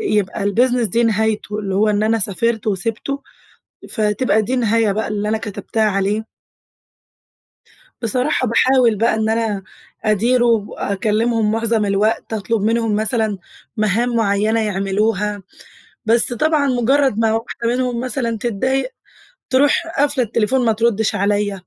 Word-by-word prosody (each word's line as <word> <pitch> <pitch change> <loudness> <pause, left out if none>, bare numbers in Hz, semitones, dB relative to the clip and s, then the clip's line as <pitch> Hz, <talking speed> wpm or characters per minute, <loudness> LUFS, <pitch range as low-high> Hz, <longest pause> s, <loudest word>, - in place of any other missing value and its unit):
يبقى 210 - -1
الbusiness 240 +3 +2
دي 230 +6 +1
نهايته، 220 -1 0
اللي 195 -2 -3
هو 215 +2 +2
إن 205 0 0
أنا 225 +1 +2
سافرت 220 +3 -1
وسِبته، 225 +7 -2 0.7
فتبقى 215 +1 +1
دي 215 +5 -3
النهاية 230 -3 +2
بقى 220 +3 -2
اللي 210 0 -2
أنا 220 - +1
كتبتها 220 +1 -3
عليه. 205 +1 0 1.8
بصراحة، 250 +3 0
باحاول 245 0 +3
بقى 225 +2 +1
إن 220 0 0
أنا 220 -3 -1 0.4
أديره 235 +4 +2
وأكلمهم 220 0 0
معظم 225 -1 0
الوقت، 205 +3 0
أطلب 215 0 -1
منهم 225 0 +1
مثلًا 220 -1 0 0.4
مهام 220 +3 +1
معيّنة 215 0 +1
يعملوها، 205 0 -1 0.6
بس 230 +2 +3
طبعًا 300 +2 +1
مجرد 260 -1 +2
ما 225 -1 +2
واحدة 230 +1 -3
منهم 245 0 -1
مثلًا 245 -3 -2
تتضايق 255 +4 -1 0.6
تروح 280 +5 +3
قافلة 285 -2 +2
التليفون 230 +4 0
ما 225 - +3
تردش 220 -1 +1
عليَّ، 205 +1 0
220 Hz, 130 wpm, -19 LUFS, 210-240 Hz, 1.8 s, باحاول